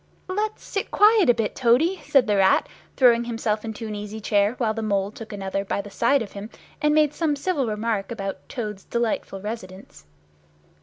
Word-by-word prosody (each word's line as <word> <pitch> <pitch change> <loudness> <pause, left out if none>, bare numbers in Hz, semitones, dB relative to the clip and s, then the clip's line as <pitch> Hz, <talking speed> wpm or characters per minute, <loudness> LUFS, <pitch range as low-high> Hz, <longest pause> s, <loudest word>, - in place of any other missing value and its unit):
"Let's 425 +3 -2
sit 395 - -3
quiet 420 - +5
a - - +8
bit, 225 -2 -2
Toady!" 280 +9 +2
said 270 -4 +4
the 210 -2 +1
Rat, 190 -1 +4 0.3
throwing 240 -3 +5
himself 225 -2 -2
into 225 0 -6
an 215 - -5
easy 210 +1 -6
chair, 205 +1 +1
while 225 -3 0
the 225 - -4
Mole 200 -2 0
took 225 0 -10
another 195 -1 -3
by 200 - -2
the 200 0 -7
side 240 +5 +2
of 205 - -10
him 200 +2 -8 0.3
and 300 0 +3
made 300 -1 +3
some 310 -2 0
civil 285 -3 -1
remark 215 -1 -2
about 195 -4 -5
Toad's 210 -6 -5
"delightful 230 -4 -2
residence." 190 - -8
225 Hz, 190 wpm, -24 LUFS, 205-265 Hz, 0.3 s, a